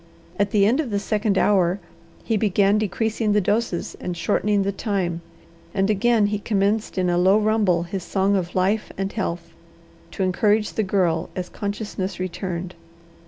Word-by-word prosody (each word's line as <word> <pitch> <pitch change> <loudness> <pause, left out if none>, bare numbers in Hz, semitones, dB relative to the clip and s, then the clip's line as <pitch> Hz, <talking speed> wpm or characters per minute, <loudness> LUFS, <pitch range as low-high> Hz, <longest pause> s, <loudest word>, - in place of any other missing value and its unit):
At 205 0 +2
the 200 -1 +3
end 240 +8 +3
of 300 -6 -1
the 205 - 0
second 210 0 0
hour 190 -2 +3 0.4
he 225 - 0
began 205 0 +3
decreasing 215 +1 0
the 210 - +4
doses 205 -2 -1
and 180 -1 -4
shortening 205 +2 +1
the 200 - 0
time, 190 -5 -2 0.5
and 195 +1 +2
again 220 +1 +3
he 205 0 -1
commenced 205 0 0
in 185 -1 +1
a 175 0 +2
low 190 +3 +5
rumble 210 -5 +2
his 185 +2 -4
song 195 +3 +1
of 180 -3 -2
life 195 +4 +1
and 195 0 -3
health, 170 -5 -4 0.6
to 195 - -3
encourage 210 +3 +1
the - - 0
Girl 180 -4 0
as 180 -1 -4
consciousness 200 -2 -4
returned. 185 -1 -4
200 Hz, 165 wpm, -23 LUFS, 185-210 Hz, 0.6 s, low